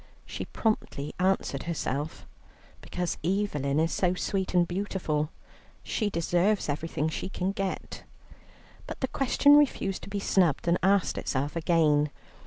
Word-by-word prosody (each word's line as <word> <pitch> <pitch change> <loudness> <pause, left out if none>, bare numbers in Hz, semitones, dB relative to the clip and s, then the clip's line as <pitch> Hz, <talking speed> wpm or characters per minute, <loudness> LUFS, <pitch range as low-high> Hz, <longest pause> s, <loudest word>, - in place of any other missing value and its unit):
She - - -5
promptly 180 -10 -2
answered 185 -7 0
herself, 150 -2 -3 0.6
"Because 180 -2 -3
Evelyn 155 -7 0
is 165 +1 +2
so 180 -1 +1
sweet 190 0 -2
and 175 -1 +4
beautiful, 175 -5 -1 0.5
she 215 -3 -1
deserves 175 +4 +1
everything 150 +1 -1
she 160 +4 -4
can 190 0 -1
get." 195 -1 -4 0.9
But - - -7
the 260 - +1
question 280 +2 +4
refused 260 -9 +1
to - - -9
be 200 0 -2
snubbed, 175 -6 +2
and 170 +1 +3
asked 195 0 +2
itself 140 +3 -2
again. 155 -3 +3
175 Hz, 135 wpm, -28 LUFS, 155-195 Hz, 0.9 s, and